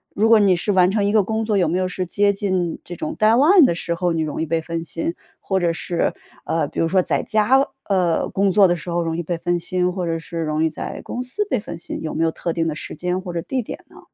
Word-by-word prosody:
如 215 +2 +3
果 225 -2 +7
你 195 -3 +4
是 205 +4 -1
完 185 -1 +5
成 205 0 +1
一 205 - +2
个 215 -2 +5
工 220 +3 -2
作 215 -2 +1
有 180 -3 +3
没 170 +3 0
有 185 0 0
是 185 0 -3
接 200 +3 +2
近 185 -4 -1
这 175 - -8
种 310 - -4
deadline 275 - +6
的 - - +2
时 170 0 -3
候， 175 0 0
你 160 - 0
容 155 0 -3
易 - - 0
被 165 +1 0
分 165 0 -4
心？ 165 0 -3 0.3
或 190 -1 0
者 170 -1 +1
是， 170 +1 -1 0.3
呃， 160 -3 0
比 - - -6
如 165 - +2
说 185 +2 +3
在 - - -1
家， 240 +6 +3 0.2
呃， 180 -4 +1
工 195 0 +1
作 195 +1 +6
的 175 - +2
时 170 +1 -8
候 175 0 0
容 165 -1 -2
易 175 - -2
被 175 +2 -2
分 175 +1 0
心， 180 +1 0
或 185 -2 -3
者 165 -1 -1
是 165 +1 -6
容 155 0 0
易 160 - +2
在 155 - -6
公 250 - -4
司 255 +12 -2
被 - - +1
分 170 -5 -8
心， - - -6
有 155 - -3
没 160 - 0
有 165 - +3
特 170 - -3
定 165 0 0
的 155 - -2
时 - - -7
间 180 +3 -2
或 180 -2 -7
者 170 - -2
地 255 +8 -2
点 - - -7
呢？ - - -16
180 Hz, 335 characters per minute, -21 LUFS, 165-205 Hz, 0.3 s, 果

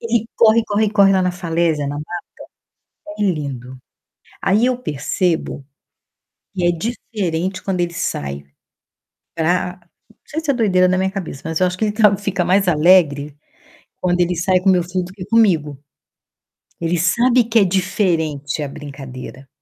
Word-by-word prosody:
ele 230 -1 0
corre, 230 0 +5
corre, 210 0 +1
corre 200 -2 +5
lá 190 -1 +2
na 180 0 0
falésia, 165 -4 -1
na 145 +1 -4
mata. 150 - -5 1.1
É - - -1
lindo. 135 -7 -3 0.6
Aí 210 +5 +3
eu 250 -1 0
percebo 160 - -2 0.9
que 180 -2 -1
é 175 - +4
diferente 185 -2 -3
quando 190 -2 -2
ele 170 0 -2
sai 70 - -3 0.9
pra 180 +2 0 0.3
não 220 - -24
sei 315 - -4
se 310 -3 0
é - - 0
doideira 190 -6 +3
da 185 - +1
minha 190 0 +1
cabeça, 185 -8 -6
mas 160 +1 -2
eu 185 - +4
acho 180 +1 -4
que 220 - 0
ele 210 - 0
tá 210 -2 +5
fica 195 -3 -1
mais 190 +1 +2
alegre 150 -4 +3 0.7
quando 180 -1 +1
ele 175 0 +1
sai 185 +2 +2
com 190 - +2
meu 180 -2 +3
filho 180 +1 -3
do 180 - -11
que 185 -3 -8
comigo. 180 -10 +2 1.0
Ele 170 +1 0
sabe 235 +9 +3
que 230 -1 +3
é - - +5
diferente 165 -6 -1
a - - -3
brincadeira. 135 -2 -9
180 Hz, 165 wpm, -19 LUFS, 160-200 Hz, 1.1 s, corre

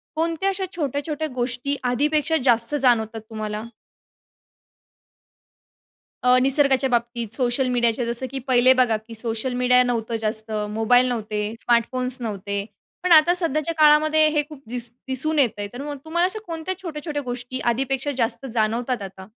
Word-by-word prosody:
कोणत्या 330 +4 0
अशा 380 0 -2
छोट्या-छोट्या 300 0 -2
गोष्टी 250 +3 -2
आधीपेक्षा 300 +5 +1
जास्त 235 +3 +3
जाणवतात 225 -5 +1
तुम्हाला? 215 -1 -5 2.6
अ, 250 0 +5
निसर्गाच्या 270 -1 +3
बाबतीत, 235 -1 -1
सोशल 255 0 0
मीडियाच्या, 240 -1 +1
जसं 235 +2 -1
की 275 - -4
पहिले 255 +1 +5
बघा 230 -3 +3
की 225 +1 -11
सोशल 225 +2 -3
मीडिया 250 0 +5
नव्हतं 230 -2 -2
जास्त, 220 +1 -3 0.2
मोबाईल 245 +4 +3
नव्हते, 215 -2 -3
स्मार्टफोन्स 250 +2 +1
नव्हते, 200 -2 -4 0.4
पण 365 -1 +2
आता 325 +3 +7
सध्याच्या 330 -2 -1
काळामध्ये 310 +1 +5
हे 300 -1 +1
खूप 290 -3 -12
दिस 240 -1 0 0.2
दिसून 300 +4 -1
येतंय, 210 -6 +1
तर 255 +3 -7
मग 290 0 -5
तुम्हाला 345 +2 0
अशा 435 +4 -3
कोणत्या 330 +2 -4
छोट्या-छोट्या 300 -3 -5
गोष्टी 250 +1 -5
आधीपेक्षा 270 +3 -1
जास्त 240 +3 -1
जाणवतात 230 +1 0
आता? 190 -1 -9
250 Hz, 140 wpm, -23 LUFS, 230-295 Hz, 2.6 s, आता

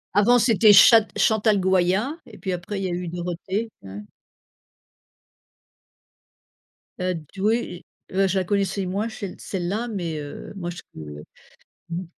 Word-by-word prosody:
Avant, 230 +5 +5
c'était 225 -3 +5
chat 220 +2 +8
Chantal 220 -1 +3
Goyat 190 - +1
et - - -13
puis 190 -3 -3
après 180 +3 -4
il - - -3
y 190 - 0
a - - -3
eu 175 0 -3
Dorothée, 180 +6 -4
hein. 100 +2 -8 3.0
Heu, 185 0 0
d 160 +4 -11
oui, 215 +2 +4
j 180 -6 -8 0.3
et - - -9
bah 195 0 +3
je 190 +1 0
la 190 - +1
connaissais 195 0 -1
moins, 200 +4 -2
chelle 200 -4 -7
celle-là, 195 +5 -3
mais, 175 -8 -4
heu, 145 +5 -8
moi 175 -3 -4
je 175 - -7
peux 75 -1 -9 0.7
mmh. 170 +2 -3
190 Hz, 160 wpm, -23 LUFS, 175-210 Hz, 3.0 s, chat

